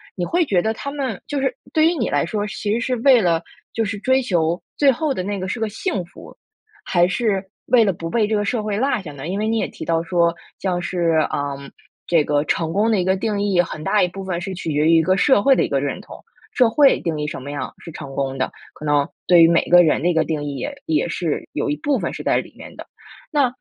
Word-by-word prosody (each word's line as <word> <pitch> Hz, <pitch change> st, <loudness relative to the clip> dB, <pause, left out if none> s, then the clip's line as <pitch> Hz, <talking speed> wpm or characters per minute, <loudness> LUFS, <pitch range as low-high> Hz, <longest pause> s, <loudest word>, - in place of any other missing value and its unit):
你 180 Hz, -, -2 dB
会 345 Hz, -, +1 dB
觉 190 Hz, -, +2 dB
得 220 Hz, +4 st, 0 dB
他 280 Hz, +5 st, -6 dB
们 265 Hz, -8 st, -4 dB
就 290 Hz, -, -2 dB
是 265 Hz, -2 st, 0 dB, 0.2 s
对 315 Hz, 0 st, +4 dB
于 340 Hz, -, +2 dB
你 235 Hz, -, -1 dB
来 145 Hz, -, +1 dB
说， 205 Hz, +4 st, -2 dB
其 210 Hz, 0 st, -3 dB
实 230 Hz, -, 0 dB
是 250 Hz, +1 st, -1 dB
为 250 Hz, 0 st, +5 dB
了 170 Hz, -3 st, +2 dB, 0.3 s
就 225 Hz, -, 0 dB
是 205 Hz, 0 st, -3 dB
追 260 Hz, +5 st, +2 dB
求 170 Hz, -7 st, 0 dB, 0.2 s
最 280 Hz, -2 st, +5 dB
后 285 Hz, +3 st, -1 dB
的 185 Hz, -, -3 dB
那 200 Hz, +1 st, -3 dB
个 185 Hz, -, -4 dB
是 225 Hz, -, -3 dB
个 220 Hz, -1 st, -1 dB
幸 220 Hz, -, -3 dB
福， 170 Hz, -, -14 dB, 0.5 s
还 175 Hz, -1 st, +3 dB
是 195 Hz, 0 st, 0 dB, 0.2 s
为 245 Hz, -2 st, +5 dB
了 195 Hz, -3 st, +1 dB
不 165 Hz, 0 st, -6 dB
被 220 Hz, +2 st, +1 dB
这 220 Hz, -, 0 dB
个 205 Hz, 0 st, 0 dB
社 220 Hz, +1 st, -1 dB
会 210 Hz, -1 st, -2 dB
落 260 Hz, -2 st, 0 dB
下 165 Hz, -6 st, -8 dB
呢？ 140 Hz, +2 st, -7 dB
因 190 Hz, +3 st, -2 dB
为 215 Hz, -, -1 dB
你 225 Hz, +1 st, +1 dB
也 -, -, 0 dB
提 -, -, -9 dB
到 165 Hz, 0 st, 0 dB
说 170 Hz, -1 st, +1 dB, 0.2 s
像 180 Hz, -2 st, -1 dB
是， 170 Hz, -3 st, +1 dB
呃， 145 Hz, -1 st, -2 dB, 0.5 s
这 165 Hz, -3 st, +3 dB
个 145 Hz, 0 st, +1 dB
成 160 Hz, 0 st, -1 dB
功 215 Hz, +4 st, +2 dB
的 215 Hz, -, +2 dB
一 -, -, +1 dB
个 190 Hz, +1 st, +2 dB
定 205 Hz, 0 st, -1 dB
义， 195 Hz, -3 st, +3 dB
很 155 Hz, -3 st, -6 dB
大 205 Hz, +4 st, +2 dB
一 -, -, +2 dB
部 195 Hz, +2 st, -8 dB
分 185 Hz, -2 st, -3 dB
是 190 Hz, +1 st, -5 dB
取 175 Hz, -2 st, -5 dB
决 150 Hz, +1 st, +2 dB
于 165 Hz, -, +5 dB
一 -, -, +5 dB
个 185 Hz, +3 st, +2 dB
社 265 Hz, -1 st, +4 dB
会 270 Hz, +4 st, +5 dB
的 -, -, +2 dB
一 -, -, -1 dB
个 140 Hz, -, +1 dB
认 140 Hz, 0 st, -3 dB
同。 -, -, -13 dB, 0.3 s
社 245 Hz, -3 st, +5 dB
会 275 Hz, +4 st, +4 dB
定 160 Hz, -3 st, -2 dB
义 150 Hz, -, -2 dB
什 150 Hz, -, -5 dB
么 140 Hz, -, -8 dB
样 145 Hz, 0 st, -5 dB
是 165 Hz, -, -10 dB
成 140 Hz, -3 st, -9 dB
功 135 Hz, -1 st, -2 dB
的， 130 Hz, -, -1 dB, 0.2 s
可 155 Hz, -, -9 dB
能 145 Hz, -1 st, +2 dB, 0.2 s
对 175 Hz, -2 st, +6 dB
于 165 Hz, -, +8 dB
每 170 Hz, 0 st, +3 dB
个 175 Hz, 0 st, +8 dB
人 155 Hz, -3 st, +2 dB
的 175 Hz, -, +3 dB
一 -, -, +2 dB
个 160 Hz, -, +2 dB
定 155 Hz, -2 st, -3 dB
义 145 Hz, -1 st, -4 dB
也 285 Hz, -, -5 dB
也 160 Hz, +1 st, 0 dB
是 170 Hz, -3 st, -3 dB
有 -, -, -2 dB
一 -, -, 0 dB
部 285 Hz, -, 0 dB
分 -, -, -3 dB
是 -, -, -6 dB
在 -, -, +1 dB
里 -, -, -5 dB
面 -, -, -12 dB
的， -, -, -10 dB, 0.5 s
那， 290 Hz, -4 st, +3 dB
185 Hz, 295 characters per minute, -21 LUFS, 165-225 Hz, 0.5 s, 于